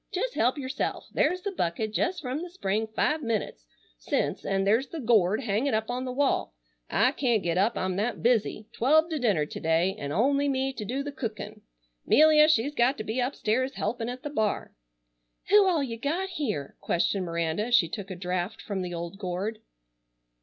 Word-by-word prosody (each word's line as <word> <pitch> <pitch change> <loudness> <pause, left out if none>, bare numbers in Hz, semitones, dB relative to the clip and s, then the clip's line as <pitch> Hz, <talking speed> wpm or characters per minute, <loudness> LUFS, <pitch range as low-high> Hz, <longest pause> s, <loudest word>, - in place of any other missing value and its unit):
Jes' 450 +6 -2
help 250 +5 +1
yourself. 265 0 -3
There's 365 0 +1
the 405 - -2
bucket 215 - -2
jes' 360 +2 0
from 270 +1 -3
the 355 - -6
spring 220 - -1
five 300 +8 0
minutes 210 - -3 0.3
since, - - -1
an' 195 0 0
there's 225 +7 +2
the 325 - -7
gourd 220 -4 +3
hanging 230 +2 0
up 220 +2 -1
on 250 +1 -3
the 255 - -3
wall. 270 - 0 0.3
I 250 - +3
can't 240 -7 +1
get 170 -1 0
up, 195 +5 +2
I'm 185 0 -1
that 215 +1 -2
busy. 225 -2 +1
Twelve 315 +7 +3
to 310 - -1
dinner 200 - +2
to - - -7
day, 165 +4 +2
an' 140 0 -4
only 275 - +2
me 270 0 0
to 220 - -6
do 265 +6 -2
the 290 - -5
cookin'. 215 -4 -6 0.5
'Melia 305 0 +6
she's 285 -1 +2
got 255 +1 +2
to 215 - -4
be 220 +4 -3
upstairs 255 0 0
helpin' 225 +2 -2
at 250 +1 -7
the 295 - -4
bar." 220 -7 -1 0.8
"Who 410 -1 +6
all 335 -6 +2
you 230 -4 -5
got 340 +9 -1
here?" 230 - -3
questioned 185 +3 0
Miranda 170 +4 -1
as 245 - +4
she 195 -8 +5
took 200 +3 -6
a 185 - -5
draught 180 +3 -3
from 200 -3 -4
the 175 -1 -4
old 170 +3 -6
gourd. 195 +3 -3
230 Hz, 195 wpm, -27 LUFS, 195-280 Hz, 0.8 s, Melia